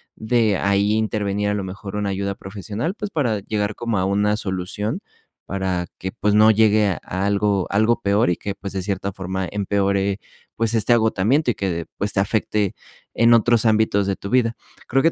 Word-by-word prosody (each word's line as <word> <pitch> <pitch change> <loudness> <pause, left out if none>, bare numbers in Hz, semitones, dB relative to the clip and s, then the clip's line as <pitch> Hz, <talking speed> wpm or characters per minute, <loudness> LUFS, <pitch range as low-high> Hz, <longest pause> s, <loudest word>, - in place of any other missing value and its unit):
de 110 -3 +1
ahí 100 +1 +2
intervenir 105 -2 0
a - - +1
lo 100 -1 -2
mejor 95 +2 -7
una 105 -1 -1
ayuda 100 +1 -2
profesional, 105 - -4
pues, 210 -2 -5
para 120 -9 0
llegar 105 +1 -2
como 115 -3 -2
a 95 - +1
una 105 +2 +2
solución, 95 +2 -3 0.5
para 95 -2 -2
que, 95 - -4
pues 105 -2 0
no 110 +1 +7
llegue 110 -1 +4
a 95 - -1 0.3
algo 100 -2 +1
algo 110 +4 +2
peor 100 0 +2
y - - +1
que, 100 -1 -5
pues 100 - -7
de 95 - -2
cierta 100 0 -2
forma 95 -1 -3
empeore, 100 0 0 0.4
pues, 115 0 0
este 115 +2 +3
agotamiento 115 +5 +2
y - - -5
que, 85 -5 -2
pues, 105 +1 -2
te 95 - 0
afecte 105 0 0 0.4
en 115 0 +5
otros 115 0 +3
ámbitos 110 -2 +2
de 100 - 0
tu 100 - -8
vida. 120 -2 +2 0.3
Creo 135 +2 +2
que 165 - +4
105 Hz, 190 wpm, -21 LUFS, 100-110 Hz, 0.5 s, no